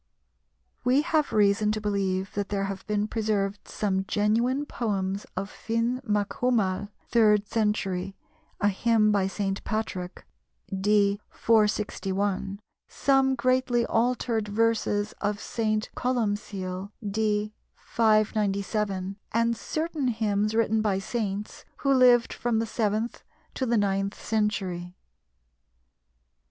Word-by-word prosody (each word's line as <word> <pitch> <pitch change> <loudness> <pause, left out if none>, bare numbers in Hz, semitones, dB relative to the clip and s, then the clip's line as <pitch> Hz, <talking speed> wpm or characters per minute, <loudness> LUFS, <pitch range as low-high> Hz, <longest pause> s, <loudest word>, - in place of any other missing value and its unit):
We 260 +4 +3
have 310 -2 +1
reason 210 0 +3
to 215 - -2
believe 195 -2 -1
that 200 -1 -2
there 200 -1 -1
have 195 -1 -5
been 210 0 0
preserved 205 -3 -1
some 190 -2 -1
genuine 235 +7 +1
poems 200 -6 -2
of 195 +1 -2
Finn 230 +4 -2
macCumaill 205 -2 0 0.2
(third 210 -3 +4
century), 195 -4 -1 0.4
a 205 - +3
hymn 215 +1 +3
by 200 -2 +2
St. 195 0 -3
Patrick 195 -5 -4 0.5
(d. 200 +1 +2
461), 205 -3 0 0.3
some 270 -1 +2
greatly 255 -1 +2
altered 230 -2 0
verses 210 -1 +1
of 205 0 -1
St. 215 -2 -1
Columcille 205 -6 -2 0.2
(d. 210 0 0 0.2
597), 210 -3 0 0.2
and 230 +1 +2
certain 310 +2 -2
hymns 215 -2 0
written 220 -1 +2
by 205 -3 +1
saints 205 0 -4
who 275 -1 +2
lived 250 -2 +5
from 235 -2 -1
the 225 - +1
seventh 220 +1 -1 0.3
to 260 - -2
the 235 0 +2
ninth 195 -1 0
century. 190 -5 -2
210 Hz, 110 wpm, -27 LUFS, 200-230 Hz, 0.5 s, lived